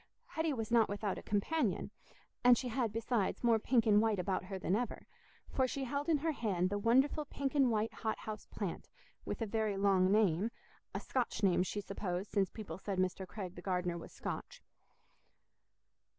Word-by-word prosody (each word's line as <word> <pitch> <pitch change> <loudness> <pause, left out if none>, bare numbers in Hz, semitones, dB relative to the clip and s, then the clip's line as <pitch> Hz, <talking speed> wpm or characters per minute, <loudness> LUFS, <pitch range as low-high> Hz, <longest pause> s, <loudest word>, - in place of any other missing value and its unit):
Hetty 320 0 0
was 225 -4 -3
not 230 -2 +5
without 205 -1 -2
a - - -9
companion, 255 +11 0 0.5
and 245 -1 +8
she 250 - -2
had, 235 -2 0
besides, 225 -2 -1
more 230 -2 +4
pink 230 0 +3
and 210 -1 +6
white 220 -2 +2
about 185 0 -1
her 190 0 -5
than 185 0 0
ever, 240 +1 -3 0.4
for 260 -1 +1
she 270 +2 -3
held 280 +4 -2
in 315 - +5
her 320 +3 0
hand 195 - 0
the 205 - 0
wonderful 265 +7 +3
pink 275 -1 -3
and 275 -4 +4
white 220 0 0
hot 220 -1 -2
house 215 -1 -7
plant, 195 -5 -5 0.4
with - - -3
a - - 0
very 215 -1 0
long 195 -1 +4
name—a 205 +1 0
Scotch 245 -4 -2
name, 185 -2 +4
she 195 +3 -2
supposed, 195 -1 -4
since 195 -2 +2
people 195 -6 -7
said 195 -1 -3
Mr. 185 +1 0
Craig 185 -4 -6
the 175 - -9
gardener 180 -2 -1
was 170 - -8
Scotch. - - -6
215 Hz, 185 wpm, -35 LUFS, 190-245 Hz, 0.5 s, and